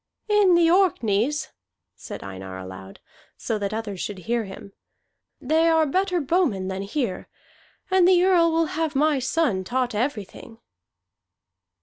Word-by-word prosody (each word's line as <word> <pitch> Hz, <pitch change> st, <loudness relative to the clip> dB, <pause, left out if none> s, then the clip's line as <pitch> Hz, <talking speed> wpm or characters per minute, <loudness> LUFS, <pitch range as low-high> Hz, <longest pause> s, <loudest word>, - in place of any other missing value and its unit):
"In 415 Hz, -4 st, +4 dB
the 340 Hz, -1 st, +4 dB
Orkneys," 295 Hz, -, +1 dB, 0.5 s
said -, -, -9 dB
Einar 95 Hz, -1 st, -8 dB
aloud, 95 Hz, +1 st, -10 dB, 0.4 s
so 220 Hz, -, -3 dB
that 200 Hz, -1 st, -2 dB
others 215 Hz, -3 st, -5 dB
should 205 Hz, -, -4 dB
hear 230 Hz, +4 st, -2 dB
him, 195 Hz, 0 st, -11 dB, 0.7 s
"they 320 Hz, +5 st, +2 dB
are 320 Hz, -1 st, +3 dB
better 365 Hz, +4 st, 0 dB
bowmen 280 Hz, -, 0 dB
than 190 Hz, 0 st, -4 dB
here, 205 Hz, 0 st, -3 dB, 0.6 s
and 375 Hz, -2 st, +5 dB
the 360 Hz, -1 st, +5 dB
Earl 350 Hz, -3 st, +4 dB
will 330 Hz, 0 st, +2 dB
have 320 Hz, -2 st, -2 dB
my 295 Hz, 0 st, +2 dB
son 260 Hz, -7 st, 0 dB
taught 250 Hz, +4 st, -1 dB
everything." 225 Hz, -1 st, -4 dB
260 Hz, 135 wpm, -24 LUFS, 200-330 Hz, 0.7 s, and